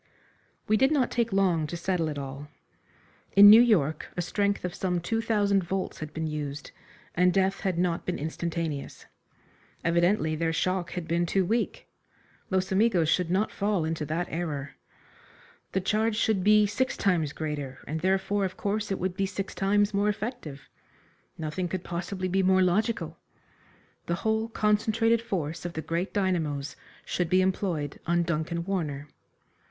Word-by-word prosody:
We 215 - +3
did 265 +5 +3
not 275 -5 +2
take 235 -2 0
long 180 -5 +2
to 170 - -5
settle 170 -2 -1
it 150 - -5
all. 140 +1 -6 0.9
In 205 +1 +10
New 225 +2 +10
York 170 - +2
a - - +1
strength 200 +2 0
of 180 - -3
some 180 -1 -1
two 225 +6 -1
thousand 205 -4 +2
volts 190 +2 -3
had 155 -1 -6
been 160 +1 -3
used, 150 -2 -5 0.4
and 180 +1 +4
death 195 +1 +1
had 190 -4 -1
not 175 -1 0
been 180 - -1
instantaneous. 160 -1 -4 0.8
Evidently 170 -1 +2
their 165 +1 -1
shock 185 +1 -1
had 175 -2 -5
been 170 +1 +1
too 190 +2 +1
weak. 230 +5 -1 0.6
Los 190 +1 0
Amigos 190 -5 +3
should 180 -1 +1
not 195 +4 +1
fall 200 -5 0
into 160 -1 -2
that 165 +4 -1
error. 150 -4 -3 1.0
The 190 - +1
charge 215 +3 +1
should 215 -3 +1
be 210 +1 +6
six 255 +6 -1
times 170 -7 +1
greater, 145 -4 -4
and 155 +2 -3
therefore, 190 +3 +1
of 185 -1 -3
course, 210 0 -2
it 195 - 0
would 180 0 -2
be 195 +1 0
six 195 0 -5
times 205 +1 +2
more 200 +1 +2
effective. 205 - -5 0.7
Nothing 165 +3 -3
could 185 0 -4
possibly 185 +2 -4
be 190 +2 +1
more 185 0 +4
logical. 215 +6 0 0.9
The 170 - 0
whole 220 +1 +1
concentrated 225 +1 +2
force 165 -8 -3
of 175 -1 -5
the 160 - -3
great 170 +5 -2
dynamos 160 -8 -1 0.3
should 180 -2 -1
be 185 0 +4
employed 180 -6 -2
on 170 0 +2
Duncan 170 +1 -2
Warner. 150 -7 -3
185 Hz, 165 wpm, -27 LUFS, 165-205 Hz, 1.0 s, In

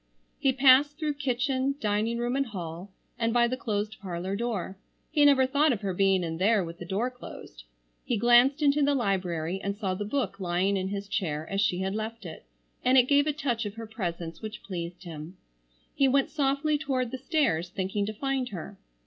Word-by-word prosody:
He 270 - +3
passed 270 +2 +5
through 305 -3 -1
kitchen, 270 0 0
dining 215 +1 0
room 240 +2 -1
and 275 -1 0
hall, 175 -2 -6 0.3
and 230 0 +1
by 240 0 +4
the 255 - -1
closed 215 -4 -3
parlor 185 0 -3
door. 210 -4 -3 0.4
He 295 -1 +3
never 275 -2 +6
thought 285 +3 +3
of 225 -4 -2
her 195 -2 -2
being 195 0 +3
in 165 -1 -4
there 205 +1 +3
with 170 0 -8
the 175 - -7
door 215 +7 -1
closed. - - -11 0.4
He 240 - -1
glanced 245 +6 +5
into 290 +1 +4
the 285 0 +3
library 185 -6 -1
and 200 0 -2
saw 195 -3 -1
the 195 +3 -3
book 210 -2 -2
lying 185 +2 +1
in 190 -1 -1
his 200 0 -4
chair 160 -7 -2
as 195 0 +1
she 185 -3 +1
had 190 +1 -1
left 220 0 -5
it, 160 - -9 0.4
and 255 +1 +4
it 255 - +8
gave 285 +1 +4
a - - +3
touch 270 -6 -2
of 205 - -8
her 230 0 -6
presence 170 -7 -5
which 215 -1 -7
pleased 175 -1 -6
him. 165 +1 -8 0.6
He 275 - +3
went 270 +1 +2
softly 290 +1 +1
toward 255 -5 -1
the 260 - -5
stairs 270 - +1
thinking 195 +2 -2
to 215 - -3
find 265 +2 -2
her. 195 +1 -8
220 Hz, 205 wpm, -28 LUFS, 190-265 Hz, 0.6 s, it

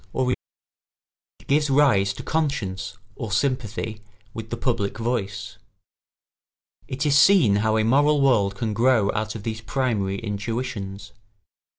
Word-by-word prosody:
[Sidenote: 125 -1 +1 1.1
It - - -23
gives 145 +1 +2
rise 130 -9 +4
to - - -8
conscience 100 -11 -2 0.2
or 115 -3 -6
sympathy 110 -3 -2 0.3
with 115 -1 -7
the 120 - -4
public 115 -5 -1
voice.] 110 -4 -3 1.3
It 135 +4 -3
is 145 -1 +3
see 185 - +6
how 110 +2 +1
a 110 - +2
moral 145 +6 +3
world 110 -8 +3
can 110 +2 -2
grow 115 -2 +3
out 110 0 -3
of 105 - -7
these 110 0 -4
primary 110 -5 -1
intuitions. 105 -1 -5
115 Hz, 130 wpm, -23 LUFS, 105-130 Hz, 1.3 s, see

